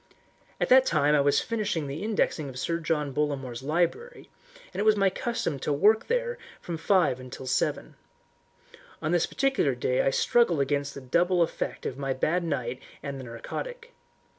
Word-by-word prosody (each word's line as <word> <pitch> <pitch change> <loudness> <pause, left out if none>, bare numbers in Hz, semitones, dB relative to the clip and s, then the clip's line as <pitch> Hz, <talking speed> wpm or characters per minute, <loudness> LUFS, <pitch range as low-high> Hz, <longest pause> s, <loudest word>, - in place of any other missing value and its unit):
At - - 0
that 260 +1 +7
time 150 -2 +3
I 150 - +5
was 140 0 +3
finishing 210 -9 -2
the 140 +3 -5
indexing 200 -8 0
of 130 - -9
Sir 165 +6 -1
John 150 -4 -1
Bollamore's 135 -4 -2
library, 175 - -2 0.4
and - - -5
it - - +2
was 215 0 +5
my 195 -2 +3
custom 190 - -2
to 150 - -2
work 210 +10 +3
there - - -1 0.2
from 170 - -5
five 160 -6 +2
till 130 - -8
seven. 130 - -1 1.1
On 155 - -2
this 175 -1 +2
particular 270 - +1
day 125 +1 +1
I - - +2
struggled 175 - +3
against 140 0 -1
the 140 - -7
double 175 +7 +2
effect 165 - -4
of 135 - -4
my 135 -1 -1
bad 170 +7 0
night 130 -5 -3 0.2
and 140 -1 -5
the - - -7
narcotic. 470 - -7
155 Hz, 175 wpm, -27 LUFS, 135-205 Hz, 1.1 s, that